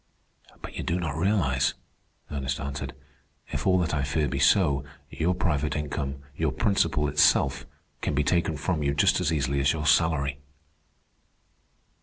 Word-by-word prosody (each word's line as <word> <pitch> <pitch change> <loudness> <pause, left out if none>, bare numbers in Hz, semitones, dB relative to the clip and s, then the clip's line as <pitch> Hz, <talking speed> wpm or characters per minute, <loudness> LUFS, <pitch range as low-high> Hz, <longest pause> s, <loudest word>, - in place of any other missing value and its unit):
"But - - -8
you - - -4
do 85 +2 -1
not 80 -5 -3
realize," 80 -8 +1 0.6
Ernest 70 -2 -3
answered. 70 0 -5 0.6
"If - - -3
all 95 -1 +4
that 85 -3 0
I 75 - +1
fear 75 +2 0
be - - -3
so, 70 -8 +3 0.3
your 90 +3 0
private 75 -6 0
income, 70 -2 -4
your 80 -1 0
principal 85 - +1
itself, 70 -1 +3 0.3
can 75 - -1
be 75 - +2
taken 85 -1 +1
from 80 +3 -1
you 70 -1 0
just 70 - +3
as 85 -3 +1
easily 70 -3 0
as 70 0 +3
your 80 -1 -4
salary." 70 -4 +2
75 Hz, 155 wpm, -26 LUFS, 70-85 Hz, 0.6 s, all